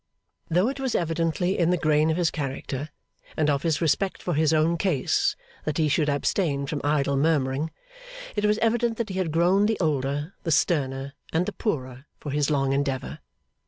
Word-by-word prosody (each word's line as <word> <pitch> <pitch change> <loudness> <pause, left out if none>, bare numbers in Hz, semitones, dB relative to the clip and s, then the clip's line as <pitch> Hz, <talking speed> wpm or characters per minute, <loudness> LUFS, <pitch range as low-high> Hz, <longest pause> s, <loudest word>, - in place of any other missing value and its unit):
Though 180 +6 +3
it 275 +1 -3
was 265 -2 -1
evidently 170 +2 0
in 170 -1 +3
the 180 - +3
grain 155 -1 +2
of 160 - +1
his 175 -3 +2
character, 140 0 -4 0.5
and 150 -1 +3
of 140 -1 0
his 160 -3 0
respect 185 +4 0
for 175 - -1
his 155 +1 +2
own 160 +2 +3
case, 165 -7 +1 0.3
that 155 -1 -2
he 155 -2 +2
should 150 0 +2
abstain 145 0 0
from 145 +1 -3
idle 145 -1 +1
murmuring, 140 0 +1 0.7
it 210 - -1
was 210 0 +3
evident 230 0 +1
that 230 -2 -2
he 190 0 -3
had 175 -4 -1
grown 180 +5 +3
the 220 - 0
older, 145 +1 -1
the 170 - -4
sterner, 140 -4 +1 0.2
and 165 +3 +1
the - - -4
poorer, 130 - -3
for 145 - -5
his 145 +1 +1
long 135 -2 +1
endeavour. 135 -1 -2
155 Hz, 190 wpm, -25 LUFS, 140-180 Hz, 0.7 s, Though